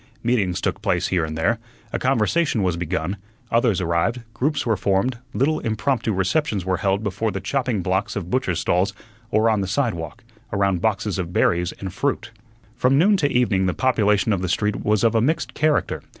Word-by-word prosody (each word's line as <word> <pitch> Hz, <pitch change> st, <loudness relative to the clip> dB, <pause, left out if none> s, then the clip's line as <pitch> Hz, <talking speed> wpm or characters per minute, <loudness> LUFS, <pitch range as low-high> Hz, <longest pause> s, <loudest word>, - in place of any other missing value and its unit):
Meetings 105 Hz, -7 st, +1 dB
took -, -, -2 dB
place -, -, 0 dB
here 90 Hz, -3 st, +1 dB
and 80 Hz, 0 st, -4 dB
there; 105 Hz, +8 st, +1 dB, 0.3 s
a -, -, 0 dB
conversation 130 Hz, 0 st, +1 dB
was 90 Hz, -2 st, +1 dB
begun; 90 Hz, +2 st, -2 dB, 0.3 s
others 115 Hz, -4 st, +2 dB
arrived; 90 Hz, +8 st, 0 dB
groups 140 Hz, +5 st, -1 dB
were 115 Hz, -2 st, +2 dB
formed; 100 Hz, +6 st, 0 dB
little 155 Hz, +4 st, +1 dB
impromptu 115 Hz, +1 st, -1 dB
receptions 100 Hz, -, 0 dB
were 95 Hz, -1 st, 0 dB
held 100 Hz, 0 st, 0 dB
before 110 Hz, +2 st, -1 dB
the 95 Hz, -, -3 dB
chopping 120 Hz, -1 st, -1 dB
blocks 95 Hz, +3 st, -1 dB
of 95 Hz, -3 st, -4 dB
butchers' 95 Hz, -10 st, 0 dB
stalls, 90 Hz, +3 st, +1 dB, 0.4 s
or 110 Hz, -1 st, +3 dB
on 110 Hz, -3 st, +2 dB
the 95 Hz, -, -2 dB
sidewalk, 100 Hz, -7 st, -2 dB, 0.3 s
around 100 Hz, -3 st, +1 dB
boxes 105 Hz, -2 st, 0 dB
of 85 Hz, -2 st, -3 dB
berries 90 Hz, 0 st, +2 dB
and 95 Hz, -2 st, -7 dB
fruit. 120 Hz, -1 st, -2 dB, 0.4 s
From 130 Hz, +2 st, +3 dB
noon 200 Hz, +7 st, +5 dB
to 145 Hz, -6 st, +1 dB
evening 105 Hz, -6 st, +2 dB
the 90 Hz, -, -1 dB
population 105 Hz, -5 st, +2 dB
of 95 Hz, -, -1 dB
the 95 Hz, -, -2 dB
street 105 Hz, +2 st, 0 dB
was 105 Hz, +1 st, +1 dB
of 115 Hz, -, +4 dB
a 115 Hz, -, +3 dB
mixed 155 Hz, +6 st, 0 dB
character. 155 Hz, 0 st, +1 dB
105 Hz, 190 wpm, -22 LUFS, 95-125 Hz, 0.4 s, noon